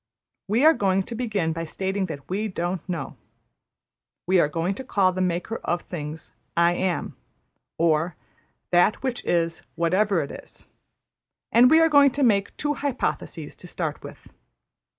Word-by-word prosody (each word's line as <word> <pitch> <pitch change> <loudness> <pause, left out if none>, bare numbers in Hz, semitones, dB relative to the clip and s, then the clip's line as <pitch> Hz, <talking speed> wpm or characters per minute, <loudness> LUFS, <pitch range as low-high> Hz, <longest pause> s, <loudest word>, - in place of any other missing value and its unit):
We 225 +8 +2
are 320 - +8
going 195 -6 +1
to 235 - -8
begin 210 -9 -1
by 165 +1 -4
stating 190 +3 -2
that 145 -5 -8
we 205 +4 -2
don't 175 -2 -3
know. 170 -2 -4 1.1
We 185 +1 +3
are 150 - +4
going 165 +5 -1
to - - -8
call 195 -7 +2
the 185 0 -3
Maker 180 +5 -1
of 175 - -2
things 155 -2 -7 0.3
`I 170 0 +4
Am,' 185 -1 -2 0.6
or 165 0 +1 0.6
`That 175 +4 +5
which 255 -2 -2
is, 165 -1 0
whatever 185 +3 +2
it 140 - -7
is'; - - -12 0.9
and 245 +2 +7
we 320 - +6
are 325 - +6
going 285 -2 +6
to 285 - 0
make 200 -5 +2
two 295 0 0
hypotheses 280 -3 -3
to - - -10
start - - -4
with. - - -12
185 Hz, 160 wpm, -24 LUFS, 170-225 Hz, 1.1 s, are